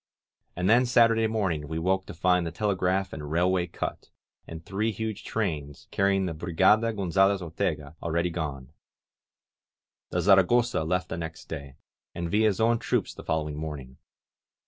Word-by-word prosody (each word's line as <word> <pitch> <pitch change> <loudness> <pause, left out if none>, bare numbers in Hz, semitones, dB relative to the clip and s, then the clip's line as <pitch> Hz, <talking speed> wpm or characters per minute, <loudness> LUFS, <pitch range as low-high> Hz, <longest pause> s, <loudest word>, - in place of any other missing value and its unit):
And 90 +1 -1
then 120 +4 +5
Saturday 115 -2 +4
morning 95 -9 -1
we 80 +2 -4
woke 95 +3 0
to - - -8
find 90 +1 +2
the 85 - -4
telegraph 95 -2 0
and 75 -1 -6
railway 90 +2 +1
cut, - - -5 0.4
and 80 0 -9
three 105 +4 -1
huge 110 0 -4
trains, 75 -10 -3
carrying 100 -1 +2
the 85 - -2
Brigada 95 +8 +3
Gonzalez 95 -1 +2
Ortega, 80 -3 -3
already 85 +1 0
gone. 70 -5 -5 1.4
The 90 - -1
Zaragosa 100 +3 +4
left 90 +1 -1
the - - -4
next 80 -1 -6
day, 70 -4 -7 0.4
and 85 -1 -3
Villa's 105 -2 +2
own 115 +1 +3
troops - - -1
the - - -11
following 75 -2 -2
morning. 70 -4 -7
90 Hz, 150 wpm, -27 LUFS, 80-100 Hz, 1.4 s, then